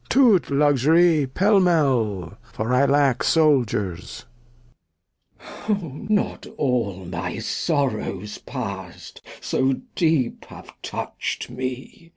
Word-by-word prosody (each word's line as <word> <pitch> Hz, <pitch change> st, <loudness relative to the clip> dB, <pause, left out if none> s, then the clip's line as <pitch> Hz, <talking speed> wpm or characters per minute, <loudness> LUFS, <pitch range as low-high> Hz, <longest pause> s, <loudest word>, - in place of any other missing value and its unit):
To't 235 Hz, -8 st, +4 dB
Luxury, 150 Hz, +2 st, +3 dB
pell 195 Hz, +9 st, +3 dB
mell, 125 Hz, -, +1 dB, 0.2 s
for 110 Hz, +3 st, -2 dB
I 130 Hz, +2 st, +4 dB
lack 140 Hz, -3 st, +2 dB
Souldiers. 120 Hz, -, +1 dB, 1.4 s
Glost. 185 Hz, -7 st, -3 dB
Not 210 Hz, -1 st, 0 dB
all 105 Hz, -8 st, -1 dB
my 85 Hz, -, -4 dB
Sorrows 110 Hz, -, -2 dB
past 100 Hz, -8 st, -7 dB, 0.2 s
so 130 Hz, +1 st, +1 dB, 0.2 s
deep 160 Hz, -8 st, 0 dB
have -, -, -13 dB
toucht -, -, -5 dB
me. 130 Hz, -, -6 dB
135 Hz, 95 wpm, -23 LUFS, 115-165 Hz, 1.4 s, To't